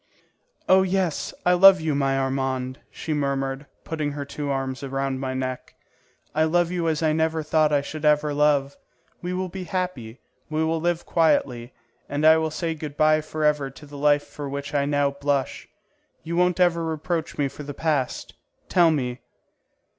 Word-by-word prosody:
"Oh 190 0 +6
yes, 185 -3 -1
I 180 - +5
love 190 +1 +8
you, 160 -1 -1
my 135 -1 +1
Armand," 130 0 -2
she 160 - -4
murmured, 140 -1 -2 0.2
putting 150 -3 -3
her 145 -1 -5
two 140 +1 -5
arms 135 -1 -2
around 135 -1 -2
my 130 -1 -3
neck. 130 -1 -4 0.6
"I 155 +1 +3
love 175 +2 +1
you 175 -2 -1
as 160 0 0
I 155 -1 +3
never 160 0 0
thought 155 0 +2
I 145 -1 +2
should 155 +1 -7
ever 150 0 +3
love. 145 -1 +2 0.5
We 180 - -4
will 185 +1 -2
be 185 +1 -7
happy; 175 - -4 0.3
we 155 0 0
will 160 0 0
live 175 0 -1
quietly, 130 -7 +1 0.4
and 145 +2 -1
I 160 0 +8
will 160 0 0
say 165 +2 -2
good 150 -2 -8
bye 155 0 +4
forever 150 -2 0
to 135 +3 -14
the 145 0 -12
life 145 0 +3
for 145 -2 -7
which 140 +2 -5
I 140 -1 +1
now 145 -1 +1
blush. 140 -1 -2 0.6
You 165 +1 -4
won't 180 +1 +2
ever 170 -2 +3
reproach 165 +1 -3
me 145 - +1
for 135 +2 -10
the 145 -1 -7
past? 150 -5 -1 0.4
Tell 175 -2 +5
me!" 130 -5 -1
150 Hz, 180 wpm, -24 LUFS, 140-160 Hz, 0.6 s, love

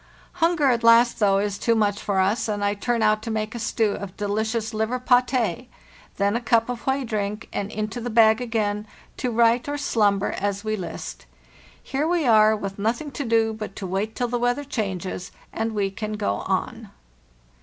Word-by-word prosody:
Hunger 330 -3 +3
at 235 -1 0
last, 230 +1 +5
though, 200 -2 +4
is 200 0 -1
too 230 - +2
much 205 -2 +1
for 200 -2 0
us, 205 +6 +1
and 205 -1 -1
I 205 - +2
turn 230 +2 -1
out 215 0 +3
to 225 - -6
make 215 0 -2
a 235 - -5
stew 220 -1 0
of 200 -2 -7
delicious 220 +2 -2
liver 220 +3 -1
'paté. 250 -3 +1 0.5
Then 200 +1 +1
a 235 - -1
cup 230 -1 +2
of 245 0 -5
whey 265 +1 +1
drink, 210 -2 -3
and 200 +1 -3
into 215 +2 -4
the 245 - -3
bag 220 0 +5
again, 215 -3 -1 0.3
to 250 - -1
write 235 +3 +3
or 290 - -2
slumber 205 -8 +1
as 200 +1 -2
we 215 0 -1
list. 185 -4 -7 0.6
Here 280 +3 -1
we 340 -3 +1
are, 215 -2 +5
with 200 -1 -6
nothing 235 +8 -1
to 275 +2 -4
do 225 -2 +2
but 215 -2 -7
to 200 - -6
wait 195 +4 -2
till 245 - -1
the 240 0 -2
weather 245 +4 0
changes 190 -9 -4 0.2
and 225 0 -2
we 200 -2 0
can 215 +1 -5
go 100 - -1
on. - - -2
220 Hz, 195 wpm, -24 LUFS, 205-240 Hz, 0.6 s, last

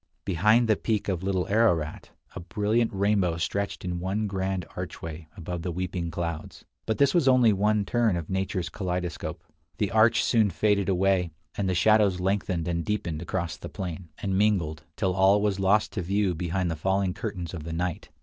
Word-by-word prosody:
Behind 105 +7 +3
the 110 - +4
peak 110 0 -1
of 90 -3 -1
Little 95 -1 -1
Ararat 100 -8 +1 0.3
a - - -4
brilliant 105 +6 0
rainbow 100 -4 +1
stretched 100 +4 -2
in 90 -1 -2
one 95 +4 -1
grand 95 -2 -2
archway 80 0 -6
above 90 0 -5
the 90 - -3
weeping 90 0 -3
clouds. 85 -1 -5 0.2
But 110 - 0
this 140 -1 +4
was 170 -6 +3
only 125 -4 +6
one 105 +1 +2
turn 115 -3 +2
of 80 -2 -5
nature's 95 -2 -2
kaleidoscope. 90 -3 -4 0.3
The 105 - 0
arch 110 0 +4
soon 110 -4 +3
faded 100 +1 +1
away, 95 -1 +2 0.3
and 100 -2 -1
the 90 - 0
shadows 105 0 +4
lengthened 90 -3 -1
and 85 -1 -1
deepened 85 -5 -2
across 85 -1 -3
the - - -8
plain, 90 -2 -6
and 95 -2 -2
mingled, 95 -7 +1 0.2
till 95 -3 +1
all 95 +2 +5
was 100 -2 0
lost 100 +3 +3
to 100 - -2
view 100 +1 +1
behind 85 +1 -1
the - - -2
falling 95 +3 0
curtains 95 -6 -5
of 80 -4 -6
the 80 - -6
night. 85 +1 -3
95 Hz, 185 wpm, -27 LUFS, 85-105 Hz, 0.3 s, only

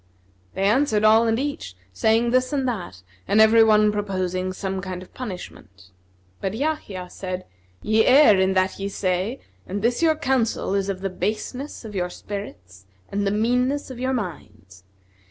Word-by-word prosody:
They 190 - -1
answered 215 0 +2
all 220 +2 +5
and 225 0 +2
each, 270 - -4 0.2
saying 225 - +2
this 255 +1 +2
and 275 -3 0
that, 175 - -5 0.2
and 205 - +3
every 220 +1 +7
one 215 -1 +4
proposing 185 -3 -2
some 190 0 -4
kind 185 -1 -6
of - - -19
punishment; 100 - -9 0.5
but 195 +2 -3
Yahya 225 -10 -3
said, 185 0 -6 0.4
"Ye 220 +1 +3
err 255 -7 +7
in 190 0 +2
that 185 0 0
ye 200 0 -3
say 190 +6 -2 0.3
and 200 +2 -4
this 240 +4 +1
your 320 -1 +4
counsel 260 -9 0
is 200 0 0
of 190 -1 -3
the 195 -1 -2
baseness 230 +8 -4
of 215 - -8
your 180 -2 -1
spirits 95 - -9 0.2
and 200 0 -1
the - - +1
meanness 250 +6 0
of 250 - -8
your 260 +1 -1
minds. 105 - -7
205 Hz, 170 wpm, -23 LUFS, 185-240 Hz, 0.5 s, every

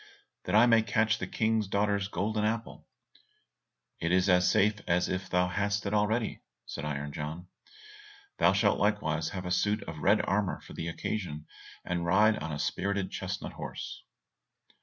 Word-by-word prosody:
"That 90 - 0
I 110 +2 +8
may 115 -2 +5
catch 110 +1 +1
the - - -3
King's 110 -2 0
daughter's 100 0 +1
golden 105 +2 -1
apple." 115 +1 -3 1.1
"It 85 - -1
is 95 +1 +3
as 90 0 +5
safe 105 0 +2
as 90 +1 +2
if 95 0 -3
thou 90 0 +2
hadst 100 +3 -1
it 100 - -2
already," 105 +2 0 0.2
said 75 - -6
Iron 75 -1 -4
John. 80 +4 -6 0.9
"Thou - - +6
shalt - - +2
likewise 80 -7 0
have 95 -1 -6
a 90 - -3
suit 105 +4 +1
of 80 -1 -7
red 105 +6 +3
armour 100 -1 0
for - - -12
the 80 - -4
occasion, 85 -3 -4 0.4
and 85 -1 -2
ride 105 +5 +4
on 80 +1 -5
a 75 - -3
spirited 100 +5 -1
chestnut - - -4
horse." - - -7
100 Hz, 165 wpm, -30 LUFS, 90-105 Hz, 1.1 s, I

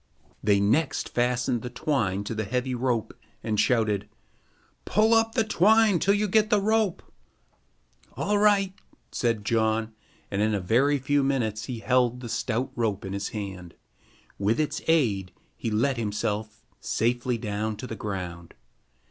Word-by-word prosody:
They 100 -1 +4
next 110 +11 +1
fastened 125 0 0
the 125 - -5
twine 110 -7 -1
to 105 - -4
the 110 0 -2
heavy 125 +4 -2
rope 120 -3 -1 0.3
and 110 -2 -1
shouted: 105 -3 +1 0.7
"Pull 220 +2 +3
up 225 0 +3
the 225 - +3
twine 215 -1 +4
till 200 +4 +3
you 210 +1 +1
get 215 +2 +3
the 210 -2 +4
rope." 215 -2 +1 1.1
"All 205 0 +1
right," 200 -2 +3 0.4
said 115 -4 -1
John, 110 0 +1 0.4
and 100 0 0
in 110 0 +2
a - - 0
very 125 +10 +2
few 140 +2 +1
minutes 120 -6 -1
he 120 -3 -6
held 125 -1 +2
the 120 - -7
stout 125 +3 -2
rope 110 -5 -1
in 95 - -5
his 100 0 -3
hand. 95 -5 -7 0.6
With 105 +6 +1
its 155 - -1
aid, 110 - +1 0.2
he 115 - -3
let 120 +5 +1
himself 105 -1 -3 0.2
safely 120 +1 0
down 110 0 -3
to 115 - -7
the 115 - -6
ground. 90 -5 -6
120 Hz, 155 wpm, -26 LUFS, 105-145 Hz, 1.1 s, They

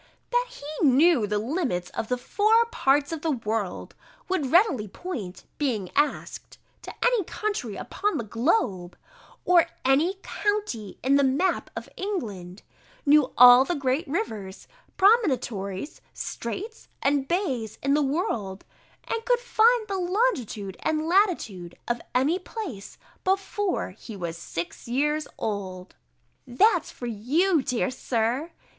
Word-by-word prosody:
_] - - -44
"that - - +2
he 305 -9 -2
knew 275 -3 +4
the 210 +1 0
limits 225 - -2
of 225 - -4
the 250 - 0
four 430 - +3
parts 280 +2 +2
of 325 -2 -4
the 325 - -1
world; 225 - -3 0.3
would 315 -9 -1
readily 325 - +4
point, 205 - -7 0.2
being 225 -11 -1
asked, 295 +1 -1 0.2
to - - -8
any 485 -4 +3
country 355 - -3
upon 415 +1 -2
the - - -2
globe, 215 - 0 0.5
or 355 -2 +5 0.2
any 295 +8 +3
county 410 - -2
in 275 +2 +4
the 280 - +3
map 275 +8 +1
of - - -6
England; 210 - -5 0.4
knew 290 -2 +5
all 250 +1 +10
the 345 +6 -2
great 280 +3 -1
rivers, 220 - -4 0.3
promontories, 260 - +1
streights, 410 - -6 0.2
and 275 -1 +2
bays 265 - -1
in 275 +1 +2
the 300 - +3
world, 265 - -2 0.4
and 455 0 -3
could - - +3
find 475 -1 +3
the 390 -2 -2
longitude 350 - -1
and 315 0 -1
latitude 325 - +1
of 240 0 -1
any 290 +8 +2
place, 365 - -7 0.3
before 390 - -1
he 215 +3 -10
was 170 -3 -4
six 170 +3 -6
years 295 +5 0
old." 190 -3 -5 0.5
There's 405 - +3
for 245 - -8
you, 285 - +1
dear 250 0 -1
Sir! 250 +4 -1
275 Hz, 135 wpm, -26 LUFS, 220-370 Hz, 0.5 s, all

